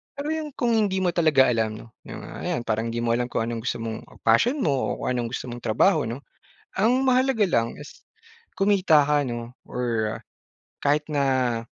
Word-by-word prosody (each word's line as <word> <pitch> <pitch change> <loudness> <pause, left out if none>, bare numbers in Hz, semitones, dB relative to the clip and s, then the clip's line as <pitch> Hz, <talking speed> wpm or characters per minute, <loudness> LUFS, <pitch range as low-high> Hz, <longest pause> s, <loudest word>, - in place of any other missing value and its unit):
Pero 285 +2 -3
yung 310 -3 -4
kung 240 -1 0
hindi 200 -4 +1
mo 180 - +2
talaga 155 -7 +4
alam 110 -2 -1
no, 115 - -17 0.2
yung, - - -8
ah, - - -9
ayan 120 - -1
parang 115 0 -1
hindi 120 +1 -3
mo 115 - +1
alam 120 +1 0
kung 115 - -1
anong 115 0 -3
gusto - - 0
mong 115 -1 -6 0.2
passion 170 - +4
mo 140 -3 0
o - - -9
kung 125 -1 0
anong 120 +1 -3
gusto 125 - -6
mong 120 - -6
trabaho, 115 - +2
'no. 125 +5 -6 0.6
Ang 245 +5 +3
mahalaga 255 -3 +3
lang 115 -11 +1
is 150 - -12 0.6
kumita 190 -7 +4
ka 145 0 +2
'no 120 0 -5 0.2
or 115 -3 -2 0.7
kahit 145 +2 +3
na 130 -5 0
130 Hz, 195 wpm, -24 LUFS, 115-195 Hz, 0.7 s, talaga